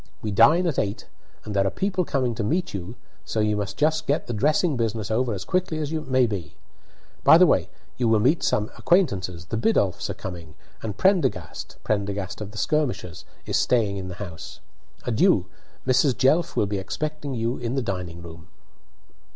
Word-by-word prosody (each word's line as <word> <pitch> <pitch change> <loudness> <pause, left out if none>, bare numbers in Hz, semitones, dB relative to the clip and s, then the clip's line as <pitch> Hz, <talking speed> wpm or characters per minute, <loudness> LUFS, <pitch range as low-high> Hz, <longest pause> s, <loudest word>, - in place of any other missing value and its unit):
We 105 - -2
dine 165 - +5
at 165 -5 0
eight, 100 +1 -2 0.4
and 105 - -5
there 100 0 +3
are - - +2
people 190 - -1
coming 130 -6 0
to 110 - -3
meet 170 - -1
you, 95 +4 -6 0.3
so 110 - -3
you 105 0 +2
must 105 0 -3
just 155 +1 +1
get 145 - +1
the 120 - -4
dressing 150 - +2
business 110 -3 -2
over 120 +2 +1
as 95 -3 -4
quickly 180 -3 0
as 150 -1 -3
may 130 -5 +2
be. 100 -8 -5 0.7
By - - +8
the - - +7
way, - - +2 0.3
you 120 -1 +1
will 110 -1 +4
meet 140 +10 +3
some 105 0 0
acquaintances; 95 - +1
the 110 - -3
Biddulphs 105 - +1
are - - -3
coming, 85 -4 -8 0.3
and 105 -2 -5
Prendergast 165 - 0
(Prendergast 100 -1 -2
of 105 - -5
the 110 - -11
Skirmishers) 130 - -1 0.2
is - - 0
staying 110 -5 +2
in 95 -1 -5
the 90 - -6
house. 90 -4 -8 0.5
Adieu! - - +3 0.4
Mrs. 130 -1 +3
Jelf 155 +6 +3
will - - +2
be 100 0 -2
expecting 150 +7 -4
you 115 +2 -1
in 120 +1 -3
the 135 - 0
drawing 90 -5 -4
room." 80 -1 -11
110 Hz, 185 wpm, -24 LUFS, 100-145 Hz, 0.7 s, By